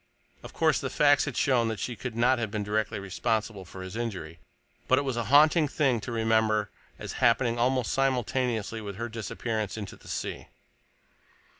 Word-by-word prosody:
Of - - -10
course - - +2
the - - -2
facts 145 -1 +4
had 140 -5 -5
shown 125 -4 +3
that 110 -1 -2
she 120 - -3
could 120 +1 -6
not 125 +2 +3
have 110 -2 -2
been 105 0 -3
directly 110 +1 -1
responsible 100 +1 -2
for 95 +2 -9
his 95 +2 -8
injury, 90 -9 -5 0.5
but 130 - +4
it 140 - +1
was 135 -3 -2
a 120 -1 -2
haunting 150 +5 +5
thing 135 -5 +1
to 120 - -6
remember 110 -2 +1 0.3
as - - -6
happening 120 0 +3
almost 125 0 +1
simultaneously 125 -4 0
with 100 -2 -6
her 115 +3 -4
disappearance 110 -1 -3
into 100 -4 -6
the - - -18
sea. - - -4
115 Hz, 180 wpm, -28 LUFS, 110-125 Hz, 0.5 s, haunting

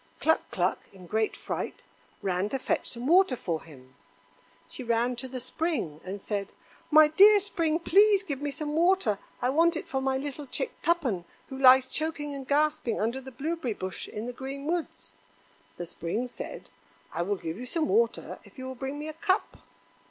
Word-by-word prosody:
Cluck 320 - +2
cluck, - - 0
in 185 -2 -14
great 220 +4 0
fright, - - -5 0.4
ran 190 +1 0
to 270 - -1
fetch 260 - -1
some 240 +1 -5
water 350 -2 +5
for 165 -8 -3
him. 130 -5 -15 0.7
She 255 - -7
ran 235 +1 +1
to 260 - -4
the 255 0 -5
Spring 255 - -2
and 190 +2 -5
said: 200 -1 -3 0.4
"My 310 -1 +8
dear 405 +7 +7
Spring, 330 -5 0
please 400 +4 +5
give 285 -7 -4
me 290 - -1
some 295 +1 -4
water. 330 - +3 0.2
I 250 - +3
want 330 +3 +3
it - - -6
for 265 - -2
my 265 0 +1
little 285 +1 -5
chick 480 - -2
Tuppen, 255 - +1 0.2
who 265 - -6
lies 260 0 +8
choking 295 +1 -2
and 270 -2 -7
gasping 295 -5 +1
under 235 +5 -1
the 265 - -9
blueberry 270 -2 -3
bush 185 -1 -5
in 210 +2 -6
the 245 - -5
green 270 +2 -6
woods." 325 - -3 0.6
The 175 - -4
Spring 175 +7 -3
said: 250 - -8 0.4
"I 170 - -1
will 200 +4 0
give 170 0 -6
you 250 - -6
some 315 +3 0
water 460 +4 +1
if - - -19
you 260 - -6
will 260 - -5
bring 270 +3 -5
me 300 +1 -5
a 310 - -5
cup." 375 +5 0
265 Hz, 190 wpm, -28 LUFS, 220-315 Hz, 0.7 s, My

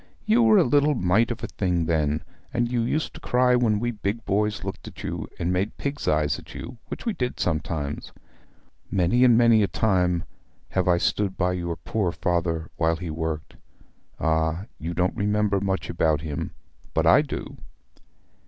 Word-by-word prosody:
You 225 +2 +4
were 220 -2 +6
a 185 - +6
little 145 +2 +3
mite 105 +2 +2
of 120 - -5
a - - -1
thing 90 -4 -1
then; 75 -2 0 0.3
and 120 0 0
you 120 -1 +1
used 150 +7 -1
to - - -10
cry 125 0 +3
when 115 -4 +2
we 120 +2 -1
big 105 +1 -3
boys 105 +1 0
looked 95 0 -6
at - - -10
you, - - -4
and 90 +1 -1
made 95 +4 -1
pig's 140 +1 -4
eyes 75 -3 +2
at - - -13
you, 120 - -8
which - - -7
we 230 - 0
did 125 -8 -3
sometimes. 75 -3 -2 0.8
Many 100 +7 +3
and 120 -3 +6
many 115 -2 +5
a 100 - +3
time 90 -6 +1 0.5
have 95 -1 0
I 90 -1 +4
stood 95 +2 0
by 90 0 +1
your 85 -2 -3
poor 90 +3 -1
father 85 -2 -1
while 80 -1 +2
he 85 -1 -5
worked. 80 -1 -4 0.6
Ah, 80 +3 0
you 85 +2 -4
don't 90 +2 +1
remember 105 0 +1
much 95 -1 -1
about 80 -3 +1
him; 75 -3 -4 0.4
but - - +2
I - - +7
do!' - - -6
95 Hz, 180 wpm, -25 LUFS, 85-115 Hz, 0.8 s, I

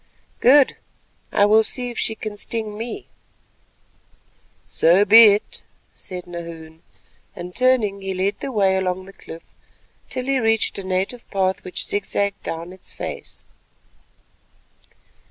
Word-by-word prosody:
"Good; 275 +2 +5 0.5
I 205 - +4
will 215 +2 +5
see 245 +2 -3
if 235 - -6
she 220 - -1
can 215 -1 -6
sting 215 0 -4
me." 235 - -6 1.6
"So 180 +5 +3
be 225 +3 +9
it," 205 0 +2 0.3
said 180 -1 -8
Nahoon; 165 -2 -9 0.5
and 180 +1 -8
turning, 240 -6 +2
he 195 -1 -4
led 195 +2 -1
the 275 - -5
way 195 -4 +2
along 185 0 -2
the 195 - -13
cliff 165 -3 -11 0.7
till 255 - -4
he 270 0 +1
reached 225 -3 +1
a - - -6
native 190 +6 -3
path 190 -1 0
which 180 - -2
zig 205 -1 -1
zagged 200 0 -1
down 165 +2 -6
its 190 - -13
face. - - -8
200 Hz, 135 wpm, -21 LUFS, 185-225 Hz, 1.6 s, be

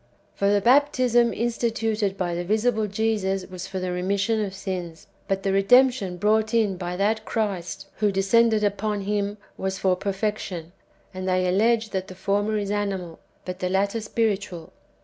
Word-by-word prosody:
For 200 - +1
the 205 0 +3
baptism 245 -1 +4
instituted 225 -3 -1
by 175 -2 -1
the 175 +1 -2
visible 215 +3 +1
Jesus 200 -2 -1
was 185 -1 -7
for 190 - -5
the 185 0 -2
remission 200 +5 0
of 195 -2 -5
sins, 180 -2 -5 0.2
but 195 0 -1
the 195 - +1
redemption 200 -2 +4
brought 220 +4 +2
in 215 -4 +2
by 180 0 -4
that 215 +3 +1
Christ 200 -7 -3
who 210 -1 +2
descended 215 +3 +3
upon 205 0 0
Him, 205 +1 -1 0.2
was 190 0 -2
for 185 -2 +2
perfection; 195 -3 -3 0.4
and 185 0 -3
they 185 0 +2
allege 220 +4 +2
that 190 -1 -2
the 185 - -10
former 205 +3 0
is 200 -1 -2
animal, 195 -5 -3 0.3
but 180 0 -5
the 180 - -1
latter 200 +4 0
spiritual. 205 -6 -2
200 Hz, 165 wpm, -24 LUFS, 190-220 Hz, 0.4 s, baptism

